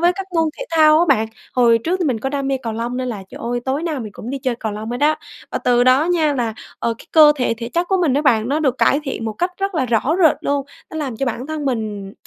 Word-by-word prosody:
với 345 +1 +4
các 390 -1 -5
môn 325 - +3
thể - - -4
thao 310 -1 +5
á, 345 - +4
bạn. 225 -5 +3 0.3
Hồi 235 -2 +4
trước 340 +10 -1
thì 350 - +1
mình 250 -6 0
có 270 - -1
đam 275 -1 -2
mê 270 - +1
cầu 225 -2 -3
lông 235 +2 -3
nên 255 -1 -2
là, 205 -5 -5
trời - - -10
ơi, 240 +1 -2
tối 270 +4 -1
nào 315 -5 -2
mình 215 -3 -7
cũng 235 - -8
đi 275 - -3
chơi 255 -2 -1
cầu 220 -2 -4
lông 215 +2 -6
hết 245 - -4
á. 305 +1 +3 0.3
Và - - -2
từ 245 0 +2
đó 260 +4 +5
nha, 320 -4 +1
là, 230 -4 -1 0.2
ờ, 230 - -1
cái - - -15
cơ 305 -2 +8
thể, 250 -3 0
thể 230 0 -5
chất 345 +6 0
của 385 - +2
mình 335 -7 +2
đó, 290 +3 +1
bạn, 230 -4 +2
nó 300 +3 0
được 265 -4 0
cải 280 - +3
thiện 265 -5 -4
một 220 - -2
cách 355 - -1
rất 390 -1 -2
là 265 -5 0
rõ 240 +7 +1
rệt 315 - +5
luôn. 280 -1 -1 0.2
Nó 315 - -7
làm 270 -7 -3
cho 270 - -2
bản 245 +3 -3
thân 310 -2 -4
mình 210 -6 -3
265 Hz, 305 wpm, -19 LUFS, 235-310 Hz, 0.3 s, cơ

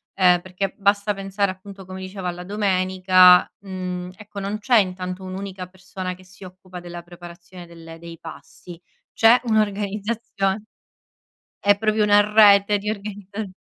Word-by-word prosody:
ehm, 180 -2 +4
perché 185 +2 -5
basta 200 +1 +1
pensare 195 0 -2
appunto 190 0 -10
come 185 0 -9
dicevo 185 -1 -6
alla 175 0 -5
domenica, 185 -2 +4
mhmm, 185 -2 -6
ecco 210 -1 -10
non 205 +2 -4
c'è 240 +2 +3
intanto 185 -1 -3
un'unica 185 0 -7
persona 185 0 -7
che 185 0 -17
si 190 +1 -16
occupa 185 -1 -11
della 175 -1 -9
preparazione 175 +1 -13
delle 165 -1 -12
dei 165 -1 -11
pasti, 165 +1 -12 0.3
c'è 230 +2 +5
un'organizzazion 210 -1 -1 1.0
è 205 0 +3
proprio 215 0 +1
una 205 0 +5
rete 205 -1 +6
di 210 +1 -3
organizza 200 -1 -7
190 Hz, 140 wpm, -22 LUFS, 180-205 Hz, 1.0 s, rete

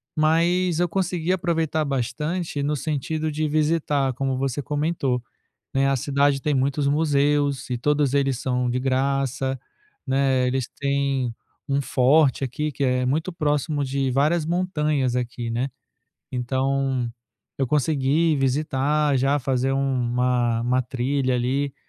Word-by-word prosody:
mas 170 +2 +2
eu 175 - +2
consegui 180 -1 0
aproveitar 165 -3 0
bastante 145 +5 -2
no 145 +1 0
sentido 155 +2 -2
de 155 +1 -1
visitar, 150 -3 +1
como 135 +1 -1
você 135 +1 -1
comentou, 145 -4 -1 0.5
né. 135 0 +2
A 135 - +2
cidade 140 +1 +1
tem 150 - +1
muitos 140 +2 +1
museus 145 -2 +1
e 125 - -1
todos 145 0 +1
eles 135 -3 +1
são 125 -2 0
de 125 +1 0
graça, 135 0 0 0.5
né. 130 -1 +2
Eles 130 -1 -1
têm 140 -3 -1 0.4
um 140 0 +1
forte 135 +1 +3
aqui 150 +4 -2
que 140 - -5
é 125 0 +1
muito 155 +7 -1
próximo 150 -2 0
de 135 0 -1
várias 150 +5 +2
montanhas 150 -7 0
aqui, 120 -1 -3
né. 120 +4 -1 0.6
Então 130 0 0 0.5
eu 135 - +1
consegui 150 +3 +2
visitar, 140 +2 +1
já 140 +3 +2
fazer 130 0 0
uma 125 -3 +1
uma 125 +1 +2
trilha 130 +2 -1
ali 130 +3 -1
140 Hz, 135 wpm, -23 LUFS, 130-150 Hz, 0.6 s, forte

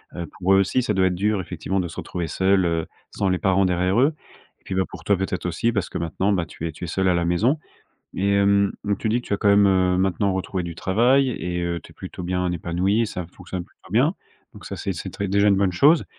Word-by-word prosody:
Heu, 85 - -4
pour 95 +1 +3
eux 95 - +6
aussi 100 +7 +2
ça 110 -3 -1
doit 95 -1 +3
être 90 - -1
dur 105 +1 0
effectivement 95 +2 -3
de 85 - -4
se 85 - -11
retrouver 85 -2 -4
seuls, 95 +4 +2
heu, 80 -1 0 0.3
sans 100 - -1
les 90 -1 +1
parents 95 0 +3
derrière 90 +4 +1
eux 140 +5 +4 0.5
et - - -35
puis 95 - -5
bah, 95 - +2
pour - - -10
toi, 100 - +4
peut-être, 95 -1 -3
aussi 90 +7 0
parce 100 -4 -1
que - - -4
maintenant, 90 +4 0
bah 90 -3 0
tu 80 - -8
es 80 - -4
tu 85 - -10
es - - -6
seule 95 +3 0
à - - +3
la 85 0 +1
maison 105 - +2 0.6
et 100 +1 +1
hem, 100 0 +3
mmh, 100 -1 0
tu 110 - -2
dis 115 +3 +1
que - - -15
tu - - -5
as - - +3
quand 100 - +1
même, 100 0 +6
heu, 95 -1 +3
maintenant 95 +1 +1
retrouvé 95 0 -2
du 85 -1 -6
travail 125 +9 +3
et 90 -6 -3
heu, 85 0 -2
tu - - -15
es - - -29
plutôt - - -8
bien 90 0 -1
épanouie, 90 +6 0
ça 90 -3 -5
fonctionne 90 0 -7
plutôt - - -22
bien, - - +3 0.4
donc - - -13
ça - - -5
c'est - - -3
c'est - - -6
très 100 - -4
déjà 100 +2 +3
une 100 - +5
bonne 95 -2 +2
chose. 150 - +5
95 Hz, 270 wpm, -23 LUFS, 90-100 Hz, 0.6 s, eux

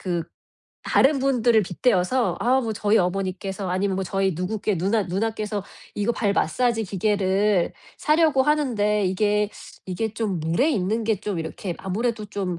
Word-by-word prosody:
그 175 -3 -2 0.6
다른 275 +1 +3
분들을 240 -5 +3
빗대어서 200 +5 +1
"아 255 +3 +3
뭐 230 -3 -2
저희 210 +1 +2
어머니께서" 190 +1 -2
아니면 190 +1 0
"저희 195 +1 0
누구께 200 +2 -1
누나 205 +5 +1
누나께서 210 +2 -2 0.3
이거 210 +3 +1
발 205 -4 0
마사지 225 +7 +1
기계를 200 -1 +1 0.3
사려고 305 -3 +3
하는데 225 -9 +1
이게, 210 +2 +1 0.4
이게 205 +4 -2
좀 210 -6 -2
물에 170 - +1
있는 215 0 0
게 220 -1 +1
좀 200 -2 -4
이렇게 170 +3 -5
아무래도 220 +3 -2
좀 190 -4 -3
205 Hz, 320 characters per minute, -24 LUFS, 190-230 Hz, 0.6 s, 다른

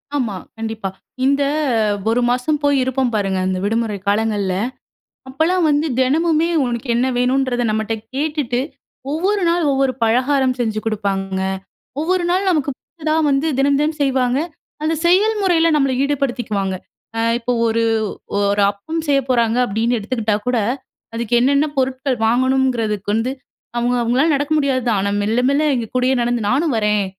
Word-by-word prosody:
ஆமா. 230 -8 -1 0.2
கண்டிப்பா. 220 -3 -4 0.4
இந்த 280 +1 +2 0.7
1 240 +2 +2
மாசம் 255 +5 0
போய் 285 -1 +3
இருப்போம் 260 -1 0
பாருங்க, 195 -2 0
அந்த 185 0 -1
விடுமுறை 220 -1 0
காலங்கள்ல. 205 -2 +1 0.8
அப்போலாம் 320 +5 +1
வந்து 295 +2 +2
தினமுமே 320 +5 +2 0.2
உனக்கு 240 +1 -3
என்ன 245 +2 +2
வேணுன்றத 250 0 +1
நம்மட்ட 220 +1 -1 0.2
கேட்டுட்டு, 285 -4 -1 0.5
ஒவ்வொரு 380 +6 0
நாள் 340 -1 +2
ஒவ்வொரு 270 -1 +1
பலகாரம் 255 +3 +2
செஞ்சு 220 -2 -1
குடுப்பாங்கங்க. 195 -3 -1 0.6
ஒவ்வொரு 355 +2 0
நாள் 380 +2 +1
நமக்கு 295 -4 +1
பிடிச்சதா 310 -2 -4 0.2
வந்து 275 +3 +1
தினம், 280 0 +3
தினம் 305 +1 -1
செய்வாங்க. 260 -1 +1 0.4
அந்த 320 +1 +1
செயல் 410 +5 +4
முறையில 335 -3 +3
நம்மள 275 -3 +2
ஈடுபடுத்திக்குவாங்க. 245 -9 -1 0.4
அ - - +1 0.2
இப்ப 245 +1 -2
ஒரு, 230 0 +1 0.6
ஒரு 200 0 +2
அப்பம் 315 +12 -5
செய்ய 275 -1 +4
போறாங்க 235 -2 +2
அப்பிடின்னு 230 +3 0
எடுத்துக்கிட்டா 215 -1 -1
கூட. 250 -2 +1 0.6
அதுக்கு 235 0 -2
என்னென்ன 280 +4 +3
பொருட்கள் 260 0 0
வாங்கணுங்கிறதுக்கு 245 -4 +1
வந்து 225 +3 0 0.5
அவுங்க 245 +1 +1
அவுங்களால 260 +7 +2
நடக்க 290 +2 -2
முடியாது 275 -4 +1
தான். 215 -4 +2
ஆனா, 200 +1 0
மெல்ல, 220 +4 +1
மெல்ல 285 +2 +2
எங்க 235 -2 -2
கூடயே 255 +1 +2
நடந்து 240 0 0
நானும் 295 +4 +1
வரேன். 210 -2 +1
255 Hz, 145 wpm, -19 LUFS, 225-285 Hz, 0.8 s, செயல்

